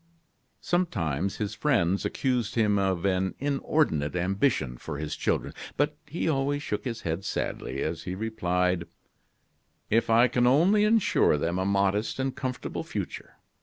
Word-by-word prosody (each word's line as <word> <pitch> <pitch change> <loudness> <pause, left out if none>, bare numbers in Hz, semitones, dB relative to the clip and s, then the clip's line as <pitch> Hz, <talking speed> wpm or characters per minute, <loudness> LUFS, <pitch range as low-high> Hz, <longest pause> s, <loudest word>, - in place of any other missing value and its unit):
Sometimes 95 - 0
his 105 -1 -3
friends 100 - +1
accused 125 -4 -1
him 105 -3 +3
of 95 -2 0
an 95 -1 +1
inordinate 135 - 0
ambition 90 - 0
for 75 -3 -6
his 75 0 -4
children; - - -1 0.2
but 145 +1 +1
he 160 +3 -2
always 145 -1 0
shook 105 -3 -3
his 115 -3 -3
head 85 +3 -3
sadly, - - -3
as 80 +1 -3
he 90 0 -3
replied: 90 -4 0 1.0
"If 115 +2 +2
I 115 +2 +6
can 125 0 +2
only 180 +11 +4
insure 215 - +3
them 85 +5 -1
a 95 - 0
modest 100 +1 +1
and 135 0 -2
comfortable 130 -2 -4
future! - - -6
105 Hz, 145 wpm, -27 LUFS, 90-135 Hz, 1.0 s, I